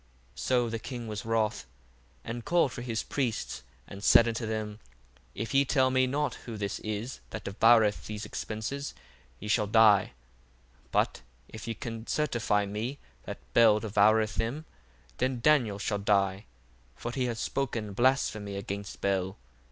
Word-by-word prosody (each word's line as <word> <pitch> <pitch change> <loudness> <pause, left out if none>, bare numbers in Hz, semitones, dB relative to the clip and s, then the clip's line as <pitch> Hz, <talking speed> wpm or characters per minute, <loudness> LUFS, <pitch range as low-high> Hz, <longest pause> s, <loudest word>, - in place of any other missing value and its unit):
1:8 - - -11
So 125 - +2
the 115 0 -3
king 120 0 -6
was 105 -1 -5
wroth, 110 - 0 0.6
and 115 +1 -5
called 170 -4 +2
for 120 - -6
his 115 -2 -2
priests, 120 - -2 0.3
and 100 +1 -9
said 115 - +7
unto 115 0 -2
them, 110 -1 -3 0.6
If 115 +4 -4
ye 135 +1 +5
tell 130 -1 +2
me 130 0 +3
not 140 -1 0 0.2
who 110 - -5
this 100 -1 -3
is 110 +4 -4
that 110 - -6
devoureth 110 +1 +4
these 105 0 -5
expences, 110 +7 -4 0.4
ye 105 - -7
shall 105 -1 +2
die. 105 -2 +5 0.7
1:9 - - -32
But - - +1 0.3
if 110 +1 -9
ye 115 - -2
can 115 -1 -6
certify 120 -8 +1
me 110 +7 -4 0.3
that - - -5 0.2
Bel 110 -2 +6
devoureth 110 0 +3
them, 130 +8 -2 0.5
then 130 -1 0
Daniel 120 -7 +3
shall 105 0 -1
die: 100 -1 +1 0.5
for 120 - -5
he 130 0 -1
hath 120 -2 -2
spoken 115 -6 -2
blasphemy 110 -4 +1
against 100 0 -6
Bel. 95 0 0
110 Hz, 160 wpm, -29 LUFS, 105-125 Hz, 0.7 s, said